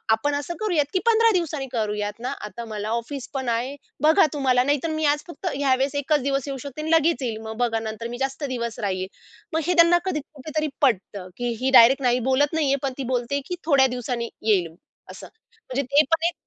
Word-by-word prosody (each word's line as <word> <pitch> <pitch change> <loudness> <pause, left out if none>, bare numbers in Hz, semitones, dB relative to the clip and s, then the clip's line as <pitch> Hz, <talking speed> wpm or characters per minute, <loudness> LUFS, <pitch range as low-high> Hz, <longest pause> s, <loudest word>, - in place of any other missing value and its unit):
"आपण 285 +6 -1
असं 290 +4 -4
करूयात, 350 -9 +1
की 370 - +2
15 455 -1 +5
दिवसांनी 310 -7 -1
करूयात 210 -2 -2
ना. 250 +3 -3 0.2
आता 235 +3 -8
मला 215 -1 -5
ऑफिस 235 +4 -4
पण 265 -3 -2
आहे. 240 +4 -1 0.3
बघा 320 +5 +6
तुम्हाला 260 -4 +2
नाहीतर 290 +3 0
मी 315 0 -1
आज 295 - -6
फक्त 345 +2 -7
ह्या 275 -1 +2
वेळेस 270 +2 -1
एकच 285 0 +1
दिवस 275 0 -1
येऊ 275 -1 -4
शकते 280 +2 -7
आणि 315 +1 -3
लगेच 325 -1 +3
येईल. 230 -4 -2
मग 220 0 -7
बघा 235 -2 +1
नंतर 220 +1 -5
मी 240 +1 -6
जास्त 270 +2 -3
दिवस 235 -3 -4
राहील." 190 -2 -2 0.5
मग 320 - +1
हे 360 - +3
त्यांना 340 0 +6
कधी 370 -5 -1
कुठेतरी 310 +2 -3
पटतं, 200 -7 0
की 245 0 -2
ही 265 - +2
डायरेक्ट 255 +4 +7
नाही 245 0 +3
बोलत 285 +4 +2
नाहीये 290 -4 +2
पण 270 - -1
ती 275 - -3
बोलते 245 +3 -1
आहे, 280 - -1
की 360 - -3
थोड्या 275 -4 +5
दिवसांनी 245 -1 -3 0.2
येईल. 185 -7 +2 0.4
असं. - - -10 0.3
म्हणजे 275 - -3
ते 280 +4 +4
पण 330 0 +2
एक 345 - -2
270 Hz, 220 wpm, -24 LUFS, 235-300 Hz, 0.5 s, डायरेक्ट